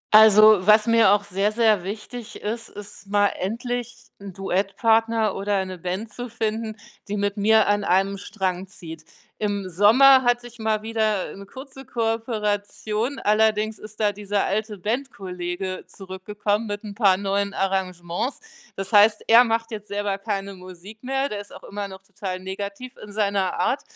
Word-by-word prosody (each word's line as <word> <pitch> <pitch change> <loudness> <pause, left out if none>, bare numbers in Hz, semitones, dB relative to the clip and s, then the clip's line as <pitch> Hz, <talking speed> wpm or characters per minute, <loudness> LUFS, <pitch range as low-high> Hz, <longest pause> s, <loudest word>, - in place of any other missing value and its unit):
Also 215 -1 +8
was 215 0 +6
mir 230 -3 +5
auch 205 0 +3
sehr, 200 +1 0
sehr 215 -4 +3
wichtig 215 +4 -7
ist, 225 +2 -4
ist 205 -1 -12
mal 205 0 +3
endlich 240 +4 -4 0.2
'n 200 -1 -8
Duettpartner 215 +4 +1
oder 200 +1 -1
eine 185 -2 -3
Band 185 +5 -4
zu 245 0 -6
finden, 220 0 -3 0.3
die 205 +1 -3
mit 200 0 -1
mir 220 +1 +4
an 205 0 +2
einem 195 +2 +1
Strang 190 -2 -3
zieht. 165 -5 -10 0.4
Im 205 -2 -2
Sommer 235 +9 +6
hatte 245 0 +1
ich 235 0 -16
mal 220 -1 0
wieder 220 -3 -1
'ne 200 - -10
kurze 270 +3 -11
Kooperation, 225 0 -2
allerdings 215 0 +1
ist 215 0 -12
da 210 -2 +2
dieser 205 0 -1
alte 210 +1 -2
Bandkollege 185 -5 -4
zurückgekommen 205 +3 -3
mit 205 0 -5
'n 205 - -7
paar 200 -4 +4
neuen 200 0 -1
Arrangements. 190 +4 -2 0.4
Das 195 +2 -5
heißt, 210 +1 +5
er 230 +2 +8
macht 230 0 -1
jetzt 210 -1 -7
selber 205 -1 -2
keine 200 -1 -4
Musik 185 +4 -12
mehr, 270 +2 -1
der 210 -6 -5
ist 205 - -15
auch - - -12
immer 205 0 -5
noch 190 0 -12
total 190 -1 -6
negativ 200 +6 -7
in 210 - -10
seiner 200 -3 0
Art, - - +1
205 Hz, 165 wpm, -23 LUFS, 195-225 Hz, 0.4 s, Also